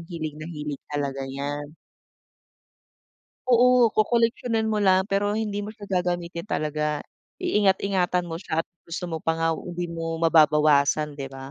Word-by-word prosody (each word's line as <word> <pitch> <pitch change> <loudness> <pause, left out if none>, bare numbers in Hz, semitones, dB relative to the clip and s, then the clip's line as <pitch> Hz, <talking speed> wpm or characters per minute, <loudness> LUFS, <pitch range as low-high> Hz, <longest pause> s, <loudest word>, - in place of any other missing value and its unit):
hilig 165 -3 -6
na 155 - -6
hilig 150 -3 -5
talaga 140 -2 -3
niyan. 145 +2 -5 1.8
Oo, 245 -1 +6
kokoleksiyonin 230 0 +1
mo 215 - +1
lang. 190 -2 +4
Pero 205 +1 +1
hindi 215 -2 -2
mo 215 - -8
siya 205 -1 -10
gagamitin 175 -1 -2
talaga. 150 -5 -1 0.4
Iingat-ingatan 195 - +2
mo 165 - -4
siya 165 -3 -1
at - - -38 0.2
gusto 170 +2 -5
mo 160 - -2
pa 165 +1 0
nga, 165 0 0
hindi 175 -1 -5
mo 165 -1 -3
mababawasan, 150 -2 +4
'di 135 - -4
ba? 135 0 -9
170 Hz, 145 wpm, -25 LUFS, 150-200 Hz, 1.8 s, Oo